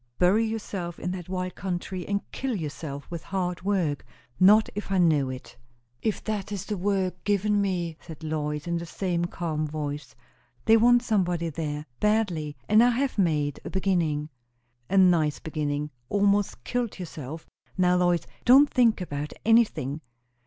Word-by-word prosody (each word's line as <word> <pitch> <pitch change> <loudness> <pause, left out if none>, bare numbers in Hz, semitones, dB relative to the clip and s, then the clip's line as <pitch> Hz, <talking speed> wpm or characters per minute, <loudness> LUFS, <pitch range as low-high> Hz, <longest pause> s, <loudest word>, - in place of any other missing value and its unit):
Bury 190 +5 +4
yourself 200 -6 -4
in 180 - -3
that 180 -2 -6
wild 185 -1 -3
country, 180 0 -4
and 200 0 0
kill 260 -3 -2
yourself 150 -4 -5
with 170 -2 -4
hard 180 -2 -3
work! 180 -7 0 0.4
Not 210 +4 +7
if 205 -1 -5
I 195 - +2
know 155 -7 +3
it." 130 -1 -8 0.5
"If 215 - -1
that 210 -2 -3
is 200 -3 -4
the 210 - -2
work 185 -1 -1
given 205 0 +2
me," 175 -5 -1
said 160 -2 -11
Lois, 150 -1 -2
in 170 0 -1
the 170 - -6
same 175 0 -1
calm 160 -3 -2
voice. 145 -4 -5 0.5
"They 225 - +7
want 240 +2 +5
somebody 180 -7 0
there, 150 -1 -4
badly; 180 -9 0
and 215 +2 +6
I 245 - +5
have 255 -1 0
made 150 -6 +1
a - - -6
beginning." 170 -6 0 0.6
"A 195 - +1
nice 170 -6 +4
beginning! 150 -2 -3 0.2
almost 200 0 +1
killed 245 -3 -2
yourself. 160 -4 -7 0.3
Now, 180 -1 +4
Lois, 175 -2 +2 0.2
don't 275 +4 +7
think 235 -5 +3
about 145 -3 -4
anything! 210 - +3
180 Hz, 160 wpm, -26 LUFS, 155-205 Hz, 0.6 s, Not